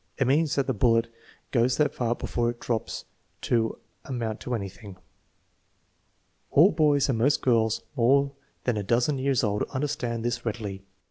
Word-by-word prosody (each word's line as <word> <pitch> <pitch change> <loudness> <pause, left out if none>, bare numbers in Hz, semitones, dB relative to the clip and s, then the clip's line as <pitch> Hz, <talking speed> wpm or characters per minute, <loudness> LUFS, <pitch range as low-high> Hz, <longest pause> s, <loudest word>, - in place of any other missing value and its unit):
It 135 - +2
means 145 +4 +2
that 140 - +1
the 130 - 0
bullet 115 +1 +2 0.4
goes 120 0 +2
that 150 - +2
far 120 -1 -1
before 120 0 -1
it 120 0 -5
drops 115 -3 -3 0.4
to 115 -2 0 0.3
amount 115 -4 -3
to 125 - -3
anything." 100 -1 -7 1.5
All 170 +8 +6
boys 150 -3 +3
and 125 -5 0
most 140 +5 +2
girls 115 -3 +2
more 140 +3 +3 0.3
than 125 -3 0
a 105 - -2
dozen 120 +7 +1
years 135 -1 +1
old 105 -1 0
understand 130 -5 -2
this 120 0 -1
readily. 105 -4 -4
120 Hz, 155 wpm, -26 LUFS, 115-135 Hz, 1.5 s, All